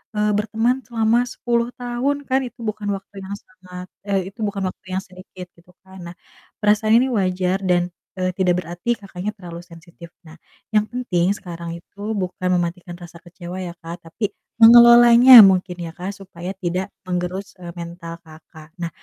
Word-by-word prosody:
eee, 210 0 +1
berteman 225 +5 0
selama 230 0 +2
10 235 -1 -1
tahun 255 +4 -2
kan, 265 +1 +2
itu 240 - -16
bukan 210 -1 -4
waktu 195 +1 -13
yang 195 +1 -6
sangat 185 -2 -12 0.2
eh, 195 -2 0
itu 225 - -33
bukan 200 -1 -4
waktu 185 - -14
yang - - -2
sedikit, 185 0 -12
gitu 175 +1 -23
kan. 190 0 -14
Nah, 170 - -10 0.4
perasaan 215 +1 +3
ini 250 - +3
wajar 185 -2 0
dan, 180 -2 0 0.2
eee, 185 0 -1
tidak 180 -2 +2
berarti 175 +8 -3
Kakaknya 195 -1 -6
terlalu 170 -3 -9
sensitif. 170 0 -15 0.2
Nah, 155 - -13 0.4
yang 215 0 +2
penting 200 -8 -1
sekarang 170 -2 -7
itu 185 +4 -21 0.2
bukan 185 -1 -3
mematikan 175 0 -4
rasa 175 -1 -13
kecewa 175 +1 -9
ya, 175 -2 -6
Kak, 170 +1 -9
tapi 210 +5 -4 0.3
mengelolanya 235 +1 +9
mungkin 185 -2 +1
ya, 165 -1 -6
Kak, 185 +4 -6
supaya 185 -1 -8
tidak 185 +1 -3 0.2
menggerus, 180 +2 -4
eee, 175 - -8
mental 170 0 -8
Kakak. 155 0 -16
Nah, 170 - -2
185 Hz, 165 wpm, -21 LUFS, 175-215 Hz, 0.4 s, mengelolanya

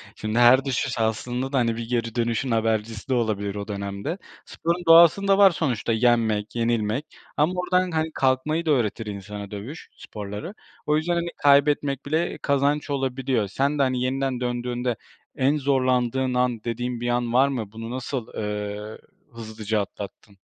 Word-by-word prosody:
Şimdi 110 +2 -2
her 125 +3 +6
düşüş 125 -2 -1
aslında 120 +4 -1
da 135 - +2
hani 115 -2 +1
bir 115 0 -6
geri 115 -2 -1
dönüşün 120 +2 0
habercisi 110 +1 -1
de - - +2
olabilir 105 -4 -1
o 100 0 -5
dönemde. 100 - -4 0.3
Sporun 170 +2 -2
doğasında 170 +4 +7
var 200 -1 +7
sonuçta, 125 -9 -1
yenmek, 110 -2 +1
yenilmek 115 +3 0 0.3
ama 155 +5 +2
oradan 180 0 +1
hani 160 0 -1
kalkmayı 135 +5 +1
da 155 - +2
öğretir 115 -4 0
insana 100 0 -7
dövüş 110 +10 -8
sporları. 105 - -7 0.3
O 150 0 +2
yüzden 170 +3 0
hani 170 0 -1
kaybetmek 140 -1 +3
bile 160 +4 -1
kazanç 140 +1 +1
olabiliyor. 130 -5 -1
Sen 140 +8 -1
de 140 - +5
hani 130 -1 0
yeniden 130 0 -1
döndüğünde 120 0 -2 0.4
en 140 +3 +2
zorlandığın 130 -2 +1
an 125 -3 0
dediğin 120 +1 -3
bir 120 - -1
an 120 -1 0
var 135 +2 +5
mı? 115 -7 -4
Bunu 115 +1 -7
nasıl, 130 -1 -4
eee, 105 0 -4 0.4
hızlıca 110 -2 -3
atlattın? 100 0 -9
125 Hz, 160 wpm, -24 LUFS, 110-140 Hz, 0.4 s, doğasında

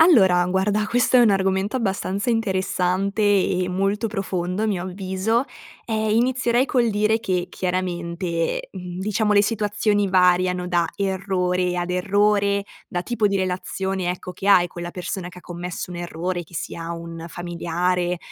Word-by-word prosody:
Allora 190 - +6
guarda, 200 +3 +1
questo 245 +2 +3
è 245 - +7
un 230 - +6
argomento 190 +1 +1
abbastanza 200 0 -1
interessante 195 -2 0
e 190 -3 +2
molto 195 +4 0
profondo 190 -2 -2
a - - +2
mio 195 -5 -1
avviso. 190 +5 -1 0.4
Ehm, 220 -1 0
inizierei 245 +2 +2
col 245 -5 +2
dire 215 +2 +2
che 180 -4 -1
chiaramente, 175 -2 -2
mhmm, 180 -2 -7
diciamo 210 +2 +1
le 205 0 +5
situazioni 205 -1 +1
variano 180 -1 +3
da 175 -1 +2
errore 185 -2 0
ad 175 0 -2
errore, 200 +2 +2 0.2
da 175 - -3
tipo 225 0 0
di 200 - +1
relazione, 185 0 -2
ecco, 180 0 -6
che 190 +2 -7
hai 180 -3 +6
con 175 - -8
la 175 - -4
persona 180 0 -4
che 180 0 -12
ha - - -12
commesso 175 0 -6
un 175 - -6
errore, 175 +1 -3
che 170 - -18
sia 165 +2 -4
un 165 0 -7
familiare, 175 +1 -1
190 Hz, 155 wpm, -23 LUFS, 180-205 Hz, 0.4 s, è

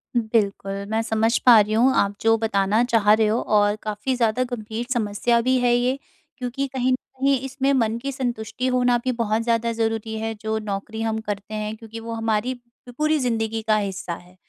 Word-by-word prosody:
बिल्कुल, 215 -4 0 0.2
मैं 220 +1 +1
समझ 225 +1 +1
पा 235 -3 +9
रही 210 +1 +1
हूँ 250 +4 +4
आप 200 0 +2
जो 225 0 +4
बताना 215 0 +1
चाह 225 -4 +3
रहे 220 0 +3
हो 220 +3 +1
और 205 -1 +2
काफ़ी 215 +4 -2
ज़्यादा 235 +1 +1
गंभीर 225 -1 -4
समस्या 235 +1 +1
भी 255 +2 +2
है 245 -1 +3
ये, 250 +2 +1 0.4
क्योंकि 260 +2 -3
कहीं 260 0 +1
न - - +4
कहीं 270 +1 -1
इसमें 270 +1 0
मन 230 -3 +1
की 275 - -3
संतुष्टि 245 -1 -3
होना 250 -1 +3
भी 255 - +1
बहुत 225 -2 0
ज़्यादा 230 0 0
ज़रूरी 225 -1 -2
है 225 0 -2
जो 220 0 -1
नौकरी 210 +1 -5
हम 220 -1 -1
करते 205 0 -5
हैं, 215 0 -3
क्योंकि 225 0 -9
वो 230 0 -6
हमारी 225 +2 0
प 245 - -14 0.4
पूरी 305 0 +2
ज़िंदगी 225 -3 -1
का 215 - +4
हिस्सा 195 -4 -3
है। 180 +2 -12
225 Hz, 200 wpm, -23 LUFS, 215-245 Hz, 0.4 s, पा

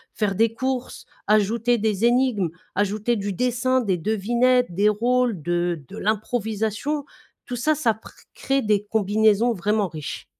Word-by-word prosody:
faire 210 -2 0
des 225 +3 +2
courses, 260 0 -3 0.2
ajouter 220 +3 +2
des 215 -1 0
énigmes, 240 -7 +2 0.2
ajouter 210 +3 0
du 200 -2 -3
dessin, 250 +4 +1
des 195 -6 0
devinettes, 235 +4 +1
des 205 +4 +3
rôles, 240 0 +1
de 175 -1 -1
de - - -10
l'improvisation. 220 +6 -2 0.4
Tout 250 - -5
ça 305 +6 +1
ça 245 -7 +1
pr 220 - -15 0.2
crée 270 0 0
des 210 -3 +1
combinaisons 215 +2 +2
vraiment 210 +1 0
riches. 155 -3 -7
220 Hz, 145 wpm, -23 LUFS, 205-245 Hz, 0.4 s, des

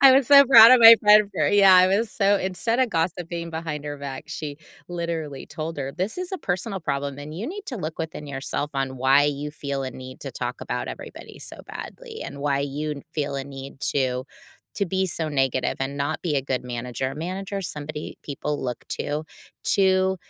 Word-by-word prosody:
I 270 -1 +9
was 265 -2 +4
so 280 -1 +9
proud 235 -3 +10
of 255 - +8
my 230 0 +12
friend 210 0 +6
for - - +2
yeah, 200 -2 +7
I 185 0 +7
was 210 +3 +1
so 200 -1 +3
instead 190 +6 -1
of 255 - +3
gossiping 170 0 -2
behind 160 -2 -5
her 145 -1 -5
back, 135 -2 -6
she 155 -4 -5 0.3
literally 165 -5 -4
told 160 +1 -6
her, 135 0 -3
"This 185 +4 -3
is 365 -1 -4
a 380 - -2
personal 195 - -2
problem, 140 -3 -3
and 150 +2 -8
you 190 - -5
need 405 +2 -7
to 250 - -4
look 160 -4 -5
within 160 -2 -5
yourself 140 +2 -3
on 135 -1 -2
why 135 +2 +4
you 145 0 -2
feel 140 -2 -4
a 130 - -4
need 130 0 -10
to 135 - -6
talk 120 0 -5
about - - -3
everybody - - -9
so - - -7
badly, 470 -3 -8
and 140 - -8
why 140 -1 0
you 145 +1 -4
feel 145 -2 -2
a 135 - -2
need 135 -1 -10
to 130 -2 0 0.6
to 200 - +2
be 190 +2 0
so 160 -2 -2
negative, 135 -2 0
and 135 +1 -3
not 145 +3 -2
be 155 -5 0
a 135 - 0
good 130 -2 -2
manager." 125 +1 -4
A - - -10
manager 190 +5 -4
is 195 - -4
somebody 150 +1 -7
people 145 0 -4
look 125 -2 -4
to, 150 +2 -3 0.5
to 190 -1 +3
155 Hz, 210 wpm, -24 LUFS, 140-190 Hz, 0.6 s, my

